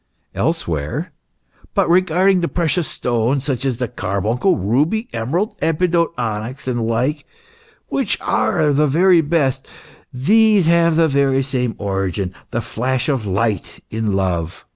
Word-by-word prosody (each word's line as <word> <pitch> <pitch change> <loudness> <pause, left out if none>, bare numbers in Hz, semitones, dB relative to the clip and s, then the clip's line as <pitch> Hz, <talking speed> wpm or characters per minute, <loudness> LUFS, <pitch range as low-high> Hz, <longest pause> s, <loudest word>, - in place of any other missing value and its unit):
Elsewhere: 75 -3 -2 0.3
" - - -31
But - - +2
regarding 185 +2 +3
the 170 - 0
precious 170 -2 0
stones, 125 +3 -1
such 135 -2 -2
as 130 -4 0
the 125 -1 -2
carbuncle, 115 - 0
ruby, 150 - 0
emerald, 165 - -1
epidote, 170 +1 +1
onyx, 120 +3 -4
and 125 -2 -1
the - - -1
like, 125 +7 -1 0.6
which 270 - -1
are 110 +8 +1
the 150 +2 +3
very 175 +4 +4
best, 145 -4 0 0.4
these 210 - +3
have 170 0 +3
the 165 0 +4
very 135 -2 +2
same 125 -3 -2
origin 95 -2 -2 0.2
the 120 - -2
flash 125 +4 -2
of 130 -7 -1
light 100 0 -1
in 110 -2 -1
love. 90 -4 -2
130 Hz, 140 wpm, -19 LUFS, 110-165 Hz, 0.6 s, very